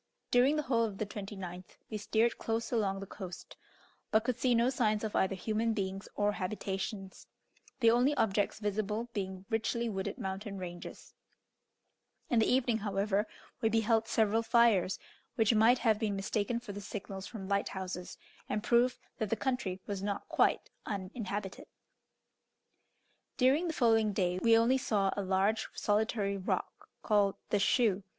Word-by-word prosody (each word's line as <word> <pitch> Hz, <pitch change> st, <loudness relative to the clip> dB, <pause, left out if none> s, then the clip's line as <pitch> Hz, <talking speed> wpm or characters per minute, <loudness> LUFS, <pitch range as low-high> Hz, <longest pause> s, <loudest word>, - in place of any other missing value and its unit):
During 255 Hz, +4 st, +5 dB
the 300 Hz, -, 0 dB
whole 235 Hz, -3 st, +2 dB
of 210 Hz, -4 st, -3 dB
the 215 Hz, -, -2 dB
29th 190 Hz, -3 st, -8 dB
we 215 Hz, -, -2 dB
steered 225 Hz, +3 st, +1 dB
close 225 Hz, 0 st, -2 dB
along 200 Hz, -5 st, 0 dB
the -, -, -5 dB
coast, 185 Hz, -3 st, -9 dB, 0.5 s
but 220 Hz, 0 st, +3 dB
could 245 Hz, 0 st, -1 dB
see 250 Hz, -1 st, +3 dB
no 235 Hz, +2 st, +3 dB
signs 215 Hz, -5 st, +1 dB
of 215 Hz, -, -3 dB
either 190 Hz, 0 st, +2 dB
human 220 Hz, +4 st, 0 dB
beings 195 Hz, -1 st, -3 dB
or 205 Hz, 0 st, +2 dB
habitations, 195 Hz, -1 st, -4 dB, 0.5 s
the 230 Hz, -1 st, +6 dB
only 250 Hz, +5 st, +3 dB
objects 205 Hz, -4 st, +1 dB
visible 210 Hz, +2 st, -2 dB
being 190 Hz, -2 st, -4 dB
richly 230 Hz, +1 st, 0 dB
wooded 190 Hz, -2 st, -3 dB
mountain 195 Hz, +1 st, -4 dB
ranges; 175 Hz, -2 st, -8 dB, 1.2 s
in 240 Hz, -, +4 dB
the 220 Hz, -, +3 dB
evening, 245 Hz, -3 st, +2 dB
however, 200 Hz, 0 st, 0 dB, 0.3 s
we 225 Hz, -, +3 dB
beheld 225 Hz, 0 st, +2 dB
several 220 Hz, 0 st, +2 dB
fires, 225 Hz, -5 st, +3 dB, 0.4 s
which 225 Hz, 0 st, +3 dB
might 225 Hz, +3 st, +5 dB
have 220 Hz, -4 st, +2 dB
been 215 Hz, -3 st, 0 dB
mistaken 210 Hz, +3 st, -1 dB
for 235 Hz, -3 st, -8 dB
the 205 Hz, +1 st, -7 dB
signals 195 Hz, -1 st, -6 dB
from 205 Hz, -5 st, -7 dB
lighthouses, 190 Hz, -2 st, -3 dB, 0.3 s
and 210 Hz, 0 st, -1 dB
proved 245 Hz, +1 st, +3 dB, 0.2 s
that 220 Hz, -3 st, -1 dB
the 225 Hz, -, +1 dB
country 220 Hz, -7 st, -2 dB
was 200 Hz, -2 st, -4 dB
not 200 Hz, 0 st, -3 dB
quite -, -, +1 dB
uninhabited. 200 Hz, 0 st, -5 dB, 1.7 s
During 275 Hz, +7 st, +3 dB
the 325 Hz, -, -2 dB
following 225 Hz, -5 st, +3 dB
day 180 Hz, -2 st, 0 dB
we 225 Hz, +3 st, +5 dB
only 245 Hz, +4 st, +3 dB
saw 200 Hz, -6 st, +1 dB
a 200 Hz, -, -1 dB
large 195 Hz, +3 st, +1 dB
solitary 205 Hz, -1 st, 0 dB
rock 190 Hz, -, -3 dB
called 205 Hz, -2 st, +3 dB, 0.2 s
"The 205 Hz, -, +3 dB
Shoe." 210 Hz, -2 st, +3 dB
210 Hz, 155 wpm, -32 LUFS, 195-230 Hz, 1.7 s, the